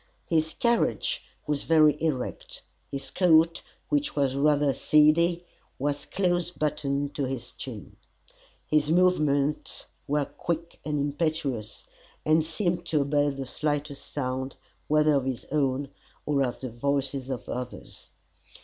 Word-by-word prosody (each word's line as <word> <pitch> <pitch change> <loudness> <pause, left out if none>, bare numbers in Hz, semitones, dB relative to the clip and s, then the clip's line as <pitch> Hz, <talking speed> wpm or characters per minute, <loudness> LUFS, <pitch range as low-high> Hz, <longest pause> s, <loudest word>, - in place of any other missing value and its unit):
His 160 -1 +1
carriage 235 - +1 0.2
was 150 -2 -1
very 155 -3 +5
erect; 150 -6 -3 0.3
his 140 0 -6
coat, 165 -2 +4 0.3
which 295 0 0
was 140 -3 +2
rather 145 0 +3
seedy, 170 +5 +4 0.3
was 145 +1 -2
close 175 -3 0
buttoned 145 -3 -1
to 140 - -1
his 130 -2 -5
chin. - - -8 0.7
His 150 -1 +2
movements 155 -5 +2 0.2
were 145 0 +1
quick 170 +2 -4
and 150 0 -1
impetuous, 145 -6 -2 0.4
and 155 +1 +4
seemed 175 +2 -1
to 155 -3 +2
obey 145 +1 +2
the 135 -1 -4
slightest 145 +1 -3
sound, 130 -1 -3 0.3
whether 150 0 +4
of 135 -2 +1
his 130 -3 -3
own, 140 -2 +1 0.4
or 145 -2 +1
of 125 -3 -1
the 130 -3 -4
voices 135 +1 -1
of 130 -2 -4
others. 125 0 -6
150 Hz, 130 wpm, -27 LUFS, 140-160 Hz, 0.7 s, very